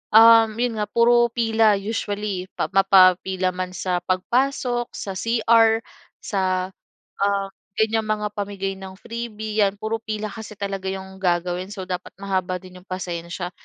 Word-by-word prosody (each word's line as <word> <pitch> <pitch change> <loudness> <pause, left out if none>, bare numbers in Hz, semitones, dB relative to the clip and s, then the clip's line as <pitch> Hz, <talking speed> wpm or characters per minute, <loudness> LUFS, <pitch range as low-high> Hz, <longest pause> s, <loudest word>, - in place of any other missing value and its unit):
um, 225 -1 +8
'yon 235 -1 -1
nga 210 - -1
puro 235 +2 +4
pila, 225 -2 +3
usually 205 -2 -3
pa - - -2
mapapila 190 -1 +4
man 185 0 -5
sa 180 0 -1
pagpasok 240 +6 0
sa 195 - -5
CR 225 +2 +3 0.4
sa, 185 -2 -1 0.5
ah, 200 0 +1 0.3
ganyang 220 0 +1
mga 210 -1 -1
pamigay 200 -1 -3
ng 190 -1 -9
freebie, 220 0 -5
'yan, 200 -1 +3
puro 220 +2 -3
pila 215 -1 -4
kasi 220 -1 -9
talaga 195 -1 -4
'yong 190 0 -6
gagawin, 180 0 0
so 195 -1 -7
dapat 180 -1 -6
mahaba 190 -2 -2
din 185 0 -10
'yong 185 - -23
pasensya. 175 -1 -5
200 Hz, 145 wpm, -23 LUFS, 185-220 Hz, 0.5 s, um